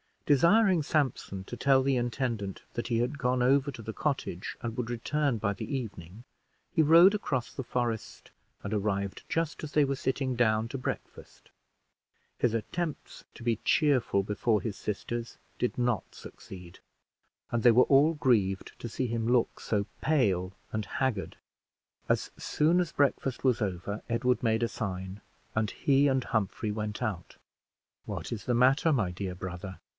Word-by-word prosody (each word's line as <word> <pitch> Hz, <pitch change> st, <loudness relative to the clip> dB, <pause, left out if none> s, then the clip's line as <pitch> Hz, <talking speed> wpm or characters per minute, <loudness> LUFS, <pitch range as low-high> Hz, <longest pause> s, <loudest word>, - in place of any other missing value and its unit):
Desiring 175 Hz, -, +5 dB
Sampson 135 Hz, -10 st, -1 dB
to 120 Hz, -, -8 dB
tell 135 Hz, +2 st, +4 dB
the 135 Hz, -1 st, +2 dB
intendant 120 Hz, -5 st, -2 dB
that 120 Hz, -, -3 dB
he 115 Hz, -2 st, +1 dB
had 125 Hz, +5 st, -1 dB
gone 125 Hz, -1 st, +1 dB
over 135 Hz, +2 st, +3 dB
to 120 Hz, -4 st, -7 dB
the 110 Hz, 0 st, -6 dB
cottage 130 Hz, -, -3 dB
and 115 Hz, -1 st, -4 dB
would 120 Hz, -2 st, -2 dB
return 135 Hz, +2 st, 0 dB
by 100 Hz, -1 st, 0 dB
the 140 Hz, -, -4 dB
evening, 100 Hz, -4 st, -7 dB, 0.5 s
he 170 Hz, -, +3 dB
rode 165 Hz, +6 st, +7 dB
across 130 Hz, -, -2 dB
the 135 Hz, -, -5 dB
forest, 120 Hz, -3 st, -3 dB, 0.3 s
and 100 Hz, -, -3 dB
arrived 100 Hz, -1 st, -1 dB
just 165 Hz, -1 st, -1 dB
as 155 Hz, -, -6 dB
they 150 Hz, -, +5 dB
were 140 Hz, 0 st, 0 dB
sitting 130 Hz, -1 st, -1 dB
down 110 Hz, -1 st, +2 dB
to 135 Hz, -, -4 dB
breakfast. 125 Hz, -, -7 dB, 0.9 s
His 120 Hz, -3 st, +2 dB
attempts 155 Hz, +8 st, -4 dB
to -, -, -11 dB
be 115 Hz, -2 st, +1 dB
cheerful 130 Hz, -, +3 dB
before 105 Hz, +1 st, +1 dB
his 105 Hz, +1 st, -4 dB
sisters 115 Hz, +3 st, -4 dB, 0.2 s
did 125 Hz, -, -1 dB
not 120 Hz, -3 st, -1 dB
succeed, 90 Hz, -3 st, -11 dB, 0.7 s
and 120 Hz, -, 0 dB
they 120 Hz, -, +7 dB
were 125 Hz, +3 st, +6 dB
all 145 Hz, +4 st, +5 dB
grieved 110 Hz, -10 st, +1 dB
to -, -, -5 dB
see 125 Hz, +3 st, -2 dB
him 115 Hz, -1 st, -2 dB
look 120 Hz, -1 st, +2 dB
so 100 Hz, -2 st, -1 dB
pale 95 Hz, -, +1 dB, 0.2 s
and 110 Hz, -1 st, -2 dB
haggard. 125 Hz, -6 st, -2 dB, 0.7 s
As -, -, 0 dB
soon 160 Hz, +4 st, +2 dB
as 175 Hz, -3 st, -1 dB
breakfast 135 Hz, -2 st, 0 dB
was 125 Hz, -3 st, +2 dB
over, 100 Hz, +1 st, -3 dB
Edward 125 Hz, +2 st, +1 dB
made 110 Hz, -1 st, +1 dB
a 115 Hz, -, +1 dB
sign, 95 Hz, -2 st, -5 dB, 0.3 s
and 110 Hz, -1 st, 0 dB
he 140 Hz, +5 st, +3 dB
and 130 Hz, -2 st, +2 dB
Humphrey 110 Hz, -1 st, -1 dB
went 105 Hz, +2 st, -3 dB
out. 100 Hz, -7 st, -4 dB, 0.7 s
"What -, -, -5 dB
is 115 Hz, -3 st, -5 dB
the 125 Hz, -, +1 dB
matter, 135 Hz, +7 st, +4 dB
my 105 Hz, -10 st, +1 dB
dear 90 Hz, 0 st, -4 dB
brother?" 95 Hz, +1 st, -7 dB
120 Hz, 165 wpm, -29 LUFS, 105-135 Hz, 0.9 s, rode